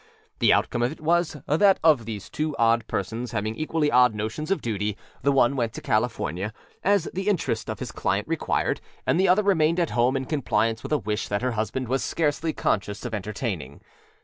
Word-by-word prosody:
The - - +5
outcome 120 - +2
of 120 +2 +1
it 155 - -9
was 165 0 +1
that 190 +6 +4
of 150 -8 +4
these 105 -2 -6
two 155 -1 -3
odd 115 -1 +3
persons 115 +5 -3
having 110 0 -1
equally 155 +3 0
odd 125 -2 +5
notions 110 +10 -4
of 195 - +1
duty, 105 -2 -2 0.2
the 140 - +3
one 135 -1 +3
went 115 -4 -1
to - - -6
California, 110 -3 -1 0.3
as 200 -3 +3
the 190 +2 -3
interest 130 - -1
of - - -3
his - - -6
client - - -1
required, - - -1 0.2
and - - +2
the 190 - +4
other 200 +4 +4
remained 170 -4 +3
at 170 - 0
home 125 +3 +2
in 130 - -3
compliance 115 -6 0
with - - -7
a 150 - +4
wish 105 -2 -3
that 100 +3 -2
her 125 - +1
husband 115 +3 -2
was 130 +3 0
scarcely 160 0 0
conscious 105 -4 -1
of 120 - -4
entertaining. 100 - -4
125 Hz, 200 wpm, -25 LUFS, 110-155 Hz, 0.3 s, The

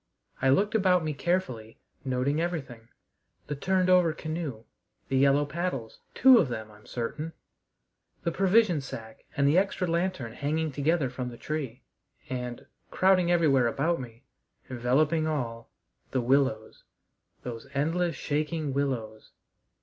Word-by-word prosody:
I 135 - +3
looked 205 - +3
about 185 -5 +3
me 155 -1 -2
carefully, 135 -10 -2 0.3
noting 135 +3 0
everything: 135 -10 -4 0.6
the 145 - -4
turned 185 +5 +1
over 180 -3 +5
canoe; 155 -8 -5 0.5
the 135 - +1
yellow 140 +2 +4
paddles 145 -7 -4 0.2
two 260 -2 +8
of - - +2
them, 110 -2 -5
I'm 105 0 -18
certain; 150 +7 -4 0.9
the 170 - 0
provision 190 -3 +3
sack 110 -4 -9
and 140 0 +3
the 155 +6 +5
extra 195 -1 -1
lantern 170 -8 -1
hanging 155 +3 -1
together 145 -1 +1
from 125 0 -4
the 120 - -10
tree; 135 -5 -4 0.5
and, 125 -1 -4 0.2
crowding 185 -2 +3
everywhere 150 -8 +4
about 150 +6 0
me, 120 0 -11 0.5
enveloping 145 +6 +2
all, 115 -7 -3 0.4
the 130 - 0
willows, 130 -3 +1 0.6
those 120 +1 -7
endless, 165 +3 0
shaking 150 0 -2
willows. 120 -6 -3
145 Hz, 135 wpm, -28 LUFS, 125-170 Hz, 0.9 s, two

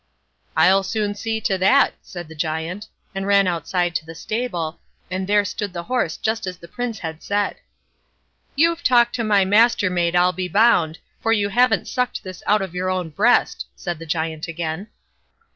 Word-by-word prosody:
"I'll 185 +5 +5
soon 205 +1 -2
see 220 +2 -3
to 190 -2 0
that", 260 +10 +4
said 175 -2 -9
the 160 - -11
Giant, 160 +6 -3 0.3
and 195 0 -3
ran 200 -1 +5
out 170 -4 -1
to 175 -2 +1
the 165 +1 -10
stable, 175 -7 -3 0.3
and 185 0 -2
there 205 0 +3
stood 205 -2 -4
the 170 -1 -5
horse 245 -6 -1
just 220 -2 -2
as 180 0 -5
the 170 - -13
Prince 240 +4 -4
had 160 -3 -6
said. 205 0 -1 1.0
"You've 335 +3 +2
talked 240 -4 +4
to 235 - -1
my 205 -3 +3
Mastermaid, 190 -5 +3
I'll 180 +1 +4
be 185 0 -3
bound, 185 -6 +3 0.2
for 225 - +1
you 205 -3 +2
haven't 235 -2 +2
sucked 250 -3 -2
this 185 -3 -9
out 210 -1 +3
of 190 -3 -6
your 180 +1 -2
own 185 -3 -2
breast", 215 +11 +2
said 175 -3 -5
the 165 - -9
Giant 160 0 -2
again. 170 +3 -4
190 Hz, 180 wpm, -21 LUFS, 170-220 Hz, 1.0 s, I'll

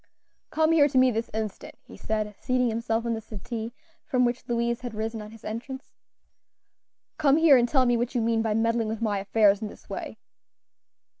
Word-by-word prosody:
"Come 315 +1 +2
here 305 -3 +5
to 265 - -1
me 255 0 +5
this 225 0 -3
instant," 215 -3 -5
he - - -13
said, 215 -1 -3
seating 250 -1 +1
himself 225 0 -1
on 235 - 0
the 225 - -4
settee, 225 +2 -6 0.3
from 250 -1 +1
which 240 +1 -1
Louise 235 0 -1
had 245 -3 -6
risen 220 +1 -3
on 210 - -9
his 225 0 -14
entrance. 255 +5 -6 1.3
"Come 290 -2 +4
here 320 -3 +7
and 240 -1 +3
tell 265 -3 +3
me 240 -1 +3
what 240 +2 -2
you 240 - +2
mean 225 0 +1
by 220 -1 0
meddling 230 0 +1
with 220 0 -3
my 205 -3 0
affairs 205 +1 +3
in 215 - -3
this - - -14
way." - - -6
230 Hz, 200 wpm, -26 LUFS, 220-250 Hz, 1.3 s, here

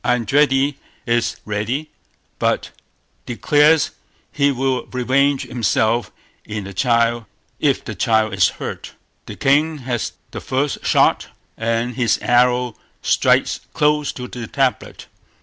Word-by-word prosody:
Eindridi 135 +3 +2 0.3
is 120 -1 0
ready, 110 +9 -3 0.5
but - - 0 0.6
declares 150 +5 +3 0.4
he 140 -1 +2
will 130 -1 -1
revenge 135 +2 +1
himself 115 0 0 0.3
if 105 -1 -5 1.2
the 110 - -5
child 110 +1 +1
is 95 -2 +4
hurt. - - -6 0.3
The - - -7
king 150 +3 +2
has 120 -3 -2 0.2
the - - -6
first 135 +2 -2
shot, - - +3 0.3
and 115 +2 -1
his 120 -3 +2
arrow 125 -1 +2 0.3
strikes - - +2 0.2
close 150 0 +2
to 125 -1 -7
the 120 -2 -7
tablet. 135 0 -1
125 Hz, 110 wpm, -20 LUFS, 115-140 Hz, 1.2 s, is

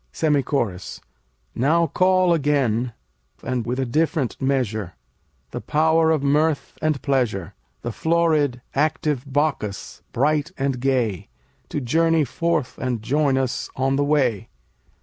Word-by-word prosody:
SEMI 150 -3 +1
CHORUS 115 -9 -3 0.5
Now 160 +7 +2
call 185 +2 +3
again, 130 -6 +1 0.5
and 125 -3 -2
with 125 +2 -2
a 135 - 0
different 150 0 -1
measure, 110 -9 -1 0.6
The - - -5
power 160 +1 +2
of 155 -3 +1
mirth 150 +1 +1
and 155 -3 +1
pleasure; 120 - 0 0.3
The 120 - -3
florid, 155 -4 +1
active 145 -2 -1
Bacchus, 140 -8 -2
bright 150 +5 +1
and 135 -2 -1
gay, 125 -8 0 0.4
To - - -2
journey 160 +5 +2
forth 155 0 -2
and 125 -4 -2
join 140 +2 +2
us 135 0 -2
on 135 +1 +1
the 145 - +1
way. 130 -8 +1
140 Hz, 130 wpm, -22 LUFS, 125-155 Hz, 0.6 s, call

